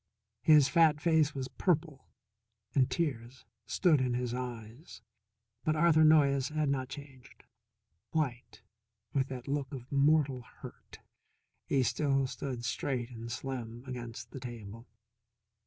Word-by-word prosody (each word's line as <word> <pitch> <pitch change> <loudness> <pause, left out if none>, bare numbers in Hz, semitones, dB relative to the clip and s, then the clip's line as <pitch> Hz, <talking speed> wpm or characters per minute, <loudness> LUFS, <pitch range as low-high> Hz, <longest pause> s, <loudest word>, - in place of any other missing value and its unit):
His 150 -3 +6
fat 155 +1 +4
face 155 -2 +2
was 130 -1 -3
purple, 155 -4 -1 0.7
and 130 -3 +3
tears 130 -6 -3 0.2
stood 160 -7 +3
in 125 -1 0
his 125 -1 -2
eyes. 120 -1 -7 0.6
But 155 - +1
Arthur 160 0 +5
Noyes 140 -4 +4
had 155 -1 0
not 130 -2 -1
changed. 135 -2 -12 0.7
White, 130 -5 -3 0.5
with 135 -1 +1
that 130 -1 -7
look 140 -1 -2
of 130 -3 -8
mortal 140 -2 +3
hurt, - - -13 0.7
he 135 -2 +2
still 135 +1 +1
stood 125 -2 -5
straight 120 +1 -2
and 115 0 -7
slim 120 -2 -5
against 120 -3 -7
the 135 - -7
table. 115 -2 -9
135 Hz, 125 wpm, -31 LUFS, 120-150 Hz, 0.7 s, His